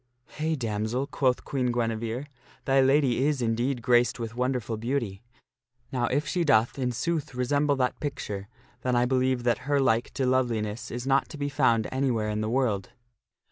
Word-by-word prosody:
" - - -47
Hey, 160 +1 +1
damsel! 115 +1 -2
" - - -32
quoth 130 -2 +2
Queen 125 -3 0
Guinevere, 115 +2 -2 0.2
" - - -28
thy 135 0 +4
lady 135 -2 +3
is, 150 -3 0
indeed, 120 +2 0
graced 120 0 +3
with 115 -1 -4
wonderful 125 -2 -1
beauty. 115 -4 -2 0.7
Now 125 -2 0
if 145 +5 0
she 175 +4 0
doth 120 -4 +3
in 125 -1 0
sooth 155 +2 -2
resemble 145 +3 +1
that 125 -2 0
picture, 105 -9 -4 0.3
then 125 -1 0
I 120 0 +3
believe 130 -1 +1
that 125 +3 0
her 145 -1 +3
like 120 -3 +2
to 135 - 0
loveliness 120 -4 0
is 120 +1 -5
not 135 0 +2
to 155 - -8
be 145 0 -2
found 115 -5 +2
anywhere 125 -5 0
in 105 0 -2
the 110 - -1
world." 115 -6 0
125 Hz, 185 wpm, -27 LUFS, 115-135 Hz, 0.7 s, thy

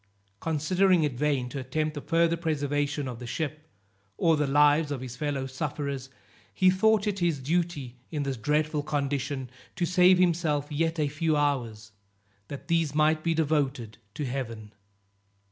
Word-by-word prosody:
Considering 175 +3 +2
it 145 -3 0
vain 135 -1 0
to 130 +3 -5
attempt 155 +4 -2
the 145 - -6
further 170 +1 +2
preservation 145 -3 -1
of 120 -2 -6
the 125 - -7
ship, 155 +4 -4 0.5
or 165 -1 +3
the 150 -1 0
lives 145 +2 +4
of 140 -3 -3
his 125 -2 -7
fellow 140 0 -2
sufferers, 140 -1 -4 0.4
he 185 -1 +4
thought 220 +2 +3
it 205 -2 -1
his 170 -4 +1
duty, 145 -3 -2
in 150 -3 -2
this 135 -1 -2
dreadful 150 +5 0
condition, 140 -2 -2 0.3
to 175 - 0
save 180 +1 +5
himself 160 -5 +1
yet 165 +2 0
a 150 - +2
few 155 +1 0
hours, 120 -7 -1 0.6
that 140 - -8
these 165 -4 +1
might 155 0 +3
be 165 -1 +1
devoted 140 -8 -1 0.2
to 150 - -3
Heaven. 115 -5 -5
150 Hz, 160 wpm, -27 LUFS, 135-165 Hz, 0.6 s, save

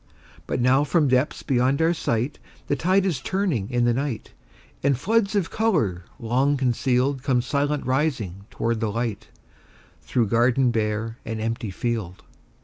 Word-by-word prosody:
But - - -1
now 130 +3 +4
from 150 -1 +2
depths 130 +3 +1
beyond 130 +1 +2
our 165 +1 +3
sight, 125 -4 -1 0.3
The - - 0
tide 185 +7 +2
is 165 -9 -1
turning 175 - -1
in 120 -1 +1
the 120 - +3
night, 130 -3 -3 0.5
And 140 -2 +2
floods 215 - +1
of 195 -4 0
color 130 - 0
long 130 +5 +1
concealed 130 +1 +1
Come 125 -3 +1
silent 145 +2 -1
rising 125 - -1
toward 115 -1 -1
the 110 -2 -1
light, 115 -2 -3 0.7
Through 115 -5 0
garden 120 +2 +3
bare 110 0 -2
and 110 -1 -4
empty 115 0 -2
field. 105 -3 -3
125 Hz, 150 wpm, -24 LUFS, 115-145 Hz, 0.7 s, now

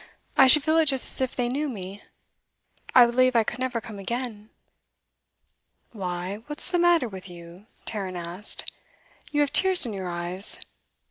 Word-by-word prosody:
I 270 - +7
should 290 +2 +7
feel 315 +2 +3
it 320 - +3
just 270 -2 +3
as - - -5
if 260 -1 -1
they 245 -1 0
knew 285 +4 -2
me. 200 -3 -8 0.9
I 250 -2 +9
believe 255 +1 +2
I 230 - +5
could 240 - -5
never 255 -2 -1
come 215 -2 -10
again.' 225 0 -5 1.4
'Why, 185 -2 -4
what's 295 +4 -6
the 355 - +2
matter 345 -6 +4
with 190 -2 -10
you?' 175 +3 -13 0.2
Tarrant 195 -4 -4
asked. 175 +4 -5 0.6
'You 295 - +2
have 285 0 0
tears 375 +1 +6
in 230 - -4
your 190 -2 -5
eyes. 175 +3 -5
230 Hz, 170 wpm, -25 LUFS, 190-270 Hz, 1.4 s, I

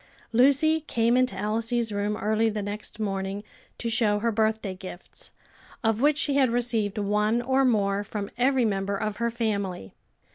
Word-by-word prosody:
Lucy 285 +6 +4
came 230 +1 +2
into 255 -6 +1
Elsie's 225 +3 -1
room 205 +1 -1
early 220 +1 +1
the 210 -1 -3
next 205 +2 -5
morning 195 -1 -3 0.3
to 235 - -4
show 225 -2 +2
her 230 +2 0
birthday 220 -2 0
gifts, 185 -1 -11 0.5
of 225 0 +1
which 295 +1 +3
she 290 -1 0
had 270 -2 +3
received 230 -3 0
one 210 +2 +1
or 260 +2 +1
more 205 -5 +1
from 205 0 -5
every 255 0 +2
member 200 -1 -1
of 215 0 -3
her 235 0 0
family. 200 - -3
220 Hz, 160 wpm, -26 LUFS, 205-240 Hz, 0.5 s, Lucy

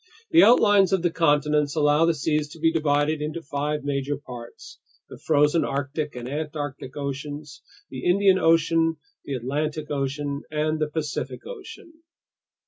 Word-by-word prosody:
The 335 +1 +7
outlines 205 -5 +5
of 185 -3 +1
the 175 - +2
continents 150 -2 +2
allow 150 +1 +3
the 165 -1 +2
seas 150 +1 0
to 165 - -13
be 165 +1 +3
divided 150 -1 +1
into 155 +2 -4
five 145 +1 -3
major 140 0 -2
parts: 120 -4 -11 0.3
the - - -11
frozen 150 +1 +3
Arctic 145 +1 -3
and 120 0 -6
Antarctic 145 -2 -5
oceans, 145 +1 -6 0.3
the 130 - -7
Indian 190 +1 +4
Ocean, 165 -1 +3 0.3
the 140 - -4
Atlantic 150 +5 -3
Ocean, 140 0 -2
and 155 +1 -1
the 155 -1 0
Pacific 150 -1 -4
Ocean. 370 -8 -10
150 Hz, 145 wpm, -24 LUFS, 145-165 Hz, 0.3 s, The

